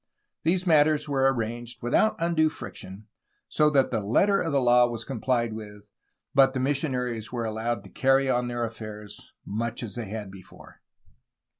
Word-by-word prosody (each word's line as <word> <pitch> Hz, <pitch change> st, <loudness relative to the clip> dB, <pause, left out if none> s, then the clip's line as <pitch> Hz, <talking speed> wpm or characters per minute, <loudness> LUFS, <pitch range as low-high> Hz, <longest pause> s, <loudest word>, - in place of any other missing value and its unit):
These 180 Hz, +3 st, +1 dB
matters 155 Hz, -2 st, +4 dB
were 135 Hz, -2 st, +3 dB
arranged 120 Hz, 0 st, -5 dB
without 170 Hz, -, +2 dB
undue 165 Hz, -2 st, +2 dB
friction, 100 Hz, -9 st, -9 dB, 0.4 s
so 150 Hz, -1 st, +3 dB
that 140 Hz, -3 st, +2 dB
the 115 Hz, -, 0 dB
letter 190 Hz, -, +2 dB
of 165 Hz, -, -2 dB
the 140 Hz, -, +2 dB
law 120 Hz, -1 st, +5 dB
was 115 Hz, -2 st, -5 dB
comphed 120 Hz, -2 st, -1 dB
with, 105 Hz, -1 st, -10 dB, 0.4 s
but 135 Hz, -1 st, +5 dB
the -, -, 0 dB
missionaries 125 Hz, -5 st, -1 dB
were 120 Hz, -2 st, -3 dB
allowed 110 Hz, 0 st, -2 dB
to -, -, -13 dB
carry 135 Hz, 0 st, +3 dB
on 125 Hz, -1 st, +1 dB
their 120 Hz, -1 st, -2 dB
affairs 105 Hz, -2 st, -9 dB
much 115 Hz, +3 st, -3 dB
as 110 Hz, -, -6 dB
they 120 Hz, -2 st, -5 dB
had 105 Hz, -2 st, -6 dB
before. 95 Hz, -2 st, -15 dB
120 Hz, 165 wpm, -26 LUFS, 110-140 Hz, 0.4 s, law